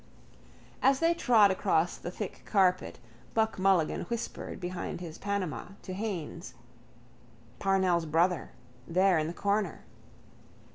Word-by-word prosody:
As 270 Hz, 0 st, +4 dB
they 330 Hz, +1 st, +3 dB
trod 230 Hz, -, +5 dB
across 175 Hz, -2 st, +1 dB
the -, -, -6 dB
thick 190 Hz, +2 st, -6 dB
carpet 185 Hz, -3 st, +2 dB, 0.4 s
Buck 220 Hz, -2 st, +1 dB
Mulligan 185 Hz, -4 st, +2 dB
whispered 235 Hz, -1 st, -5 dB
behind 180 Hz, -1 st, -4 dB
his 170 Hz, -2 st, -8 dB
Panama 195 Hz, -3 st, -3 dB
to 185 Hz, -, -6 dB
Haines: 180 Hz, -, -5 dB, 1.0 s
—Parnell's 185 Hz, -4 st, +2 dB
brother. 170 Hz, +3 st, +1 dB, 0.4 s
There 185 Hz, 0 st, +3 dB
in 155 Hz, -, -1 dB
the -, -, -3 dB
corner. 200 Hz, 0 st, -1 dB
185 Hz, 115 wpm, -30 LUFS, 175-205 Hz, 1.0 s, trod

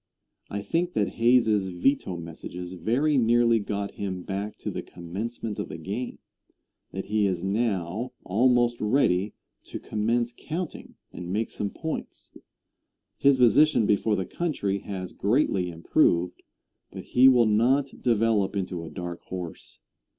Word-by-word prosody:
I 100 Hz, 0 st, -4 dB
think 170 Hz, -, -1 dB
that 105 Hz, -, +1 dB
Hayes's 115 Hz, -4 st, +3 dB
veto 90 Hz, +1 st, 0 dB
messages 90 Hz, +2 st, -7 dB
very 125 Hz, -, +1 dB
nearly 115 Hz, 0 st, +4 dB
got 100 Hz, -1 st, -3 dB
him 95 Hz, -3 st, -5 dB
back 100 Hz, +2 st, -4 dB
to -, -, -5 dB
the -, -, -4 dB
commencement 105 Hz, +5 st, -6 dB
of -, -, -4 dB
the 80 Hz, -, -6 dB
game 100 Hz, +10 st, -5 dB, 0.7 s
that 95 Hz, -, -5 dB
he 105 Hz, -1 st, +1 dB
is 90 Hz, -2 st, -2 dB
now 100 Hz, +1 st, -1 dB
almost 120 Hz, +3 st, +2 dB
ready 105 Hz, -4 st, +2 dB, 0.3 s
to -, -, -6 dB
commence 115 Hz, +3 st, -1 dB
counting, 165 Hz, +1 st, -6 dB, 0.2 s
and 90 Hz, 0 st, -6 dB
make 110 Hz, +3 st, -1 dB
some 100 Hz, -, -2 dB
points. 160 Hz, +7 st, -6 dB, 0.8 s
His 140 Hz, -1 st, +5 dB
position 125 Hz, +1 st, +5 dB
before 105 Hz, +1 st, +2 dB
the 95 Hz, -, -2 dB
country 100 Hz, -, -2 dB
has 95 Hz, -2 st, -6 dB
greatly 100 Hz, -5 st, +1 dB
improved, 85 Hz, +1 st, +1 dB, 0.5 s
but -, -, -8 dB
he 125 Hz, +1 st, +5 dB
will 125 Hz, -3 st, +6 dB
not 125 Hz, +6 st, +2 dB
develop 115 Hz, -4 st, +2 dB
into 90 Hz, -3 st, -3 dB
a 80 Hz, -, -7 dB
dark 85 Hz, +2 st, -6 dB
horse. 90 Hz, -3 st, -7 dB
105 Hz, 140 wpm, -26 LUFS, 95-120 Hz, 0.8 s, will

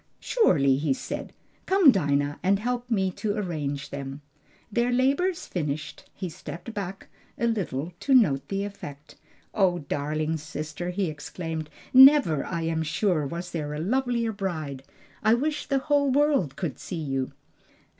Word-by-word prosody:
"Surely," 140 Hz, -, +3 dB
he 145 Hz, -1 st, +1 dB
said. -, -, -5 dB, 0.4 s
"Come, 380 Hz, -7 st, +7 dB
Dinah, 145 Hz, -, 0 dB
and 195 Hz, +2 st, +3 dB
help 245 Hz, +3 st, -3 dB
me 190 Hz, -5 st, +1 dB
to 205 Hz, +3 st, -2 dB
arrange 145 Hz, -7 st, -3 dB
them." 140 Hz, 0 st, -6 dB, 0.5 s
Their 235 Hz, +3 st, +1 dB
labors 280 Hz, +9 st, +1 dB
finished, 150 Hz, -3 st, -4 dB
he 185 Hz, -, -4 dB
stepped 175 Hz, +6 st, -8 dB
back 195 Hz, -2 st, -5 dB, 0.3 s
a 235 Hz, -, 0 dB
little 180 Hz, -, -1 dB
to 270 Hz, -, +3 dB
note 145 Hz, -, +4 dB
the 195 Hz, 0 st, -2 dB
effect. 150 Hz, -7 st, -9 dB, 0.4 s
"O 190 Hz, -4 st, +3 dB
darling 155 Hz, +1 st, -2 dB
sister," 155 Hz, +3 st, -5 dB
he 190 Hz, +2 st, 0 dB
exclaimed, 155 Hz, +1 st, -5 dB, 0.2 s
"never, 265 Hz, -, +8 dB
I 170 Hz, -2 st, -3 dB
am 160 Hz, 0 st, 0 dB
sure, 160 Hz, -1 st, 0 dB
was 170 Hz, +4 st, -5 dB
there 150 Hz, -3 st, -3 dB
a -, -, -4 dB
lovelier 235 Hz, +4 st, 0 dB
bride! 160 Hz, -10 st, -4 dB, 0.4 s
I 220 Hz, +1 st, +5 dB
wish 295 Hz, +5 st, -2 dB
the 275 Hz, -, +2 dB
whole 285 Hz, +1 st, +2 dB
world 275 Hz, -, +2 dB
could 165 Hz, -8 st, -4 dB
see 185 Hz, -, -6 dB
you!" 135 Hz, -2 st, -2 dB
180 Hz, 150 wpm, -26 LUFS, 150-235 Hz, 0.5 s, never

